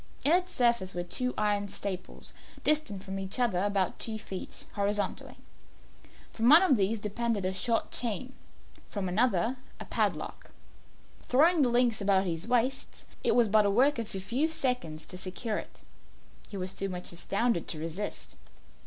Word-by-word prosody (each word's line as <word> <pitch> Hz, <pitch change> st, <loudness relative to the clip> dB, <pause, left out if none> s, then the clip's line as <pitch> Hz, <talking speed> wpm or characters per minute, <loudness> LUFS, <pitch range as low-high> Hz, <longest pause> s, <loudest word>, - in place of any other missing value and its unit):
In 290 Hz, -, +4 dB
its 360 Hz, +1 st, +3 dB
surface 235 Hz, -, +1 dB
were 175 Hz, -, -2 dB
two 250 Hz, +8 st, -1 dB
iron 205 Hz, -1 st, +1 dB
staples, 190 Hz, -2 st, -6 dB, 0.3 s
distant 295 Hz, -11 st, +1 dB
from 195 Hz, 0 st, -5 dB
each 195 Hz, +3 st, -3 dB
other 235 Hz, -8 st, +1 dB
about 195 Hz, -2 st, 0 dB
two 220 Hz, -1 st, -3 dB
feet, 195 Hz, -3 st, -7 dB
horizontally. 205 Hz, 0 st, -2 dB, 1.0 s
From 230 Hz, +1 st, +2 dB
one 320 Hz, +6 st, +9 dB
of 300 Hz, -8 st, +5 dB
these 210 Hz, +1 st, +1 dB
depended 210 Hz, -1 st, -2 dB
a 185 Hz, -, 0 dB
short 225 Hz, +4 st, 0 dB
chain, 245 Hz, +2 st, -2 dB, 0.6 s
from 200 Hz, -3 st, -3 dB
the 185 Hz, +5 st, +1 dB
other 240 Hz, +1 st, +1 dB, 0.2 s
a -, -, -6 dB
padlock. -, -, -2 dB, 0.8 s
Throwing 315 Hz, +6 st, +5 dB
the 255 Hz, -, +4 dB
links 240 Hz, -2 st, +2 dB
about 195 Hz, -1 st, +3 dB
his 165 Hz, +2 st, -3 dB
waist, 250 Hz, +2 st, 0 dB, 0.2 s
it -, -, +3 dB
was 240 Hz, -2 st, +5 dB
but 215 Hz, +1 st, +5 dB
the 205 Hz, -, +2 dB
work 255 Hz, +6 st, +3 dB
of 225 Hz, -3 st, -4 dB
a -, -, -2 dB
few 250 Hz, +11 st, 0 dB
seconds 250 Hz, -, -2 dB
to 180 Hz, -, -7 dB
secure 200 Hz, +4 st, -3 dB
it. -, -, -12 dB, 0.7 s
He 200 Hz, -, -6 dB
was 185 Hz, 0 st, -2 dB
too 195 Hz, -, -2 dB
much 180 Hz, -1 st, -3 dB
astounded 195 Hz, +3 st, -1 dB
to 160 Hz, -, -4 dB
resist. 165 Hz, +6 st, -5 dB
210 Hz, 170 wpm, -29 LUFS, 190-245 Hz, 1.0 s, one